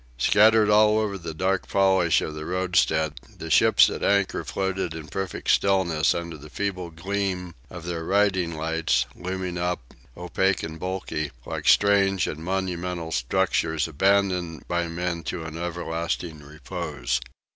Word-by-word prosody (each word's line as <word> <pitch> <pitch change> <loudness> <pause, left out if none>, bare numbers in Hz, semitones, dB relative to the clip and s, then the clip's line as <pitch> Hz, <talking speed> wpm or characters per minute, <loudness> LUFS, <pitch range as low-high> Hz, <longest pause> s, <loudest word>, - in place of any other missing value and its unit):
Scattered 110 - +5
all 105 0 +5
over 105 -2 0
the 85 -4 -6
dark 95 +3 0
polish 95 -4 +3
of 80 - -4
the 75 0 -6
roadstead, 90 -4 +1 0.2
the - - -6
ships - - +6
at - - -4
anchor 100 -1 +1
floated 95 -3 -2
in 80 -2 -8
perfect 95 +1 -2
stillness 85 -6 +2
under 85 -2 -5
the 75 +2 -12
feeble 95 -1 -3
gleam 90 +1 -3 0.2
of 85 -2 -9
their 85 -2 -3
riding 95 -2 +2
lights, 80 -5 0
looming 90 -1 -4
up, 90 -8 -3 0.2
opaque 90 +2 0
and 80 0 -6
bulky, 90 -5 -3 0.2
like - - -5
strange 100 -2 +4
and 80 +1 -5
monumental 90 -2 -3
structures 80 +3 0
abandoned 90 -1 +1
by 85 0 -1
men 85 0 -3
to 80 +1 -4
an 80 0 -7
everlasting 85 -1 -3
repose. 75 -2 -4
90 Hz, 145 wpm, -25 LUFS, 80-95 Hz, 0.2 s, ships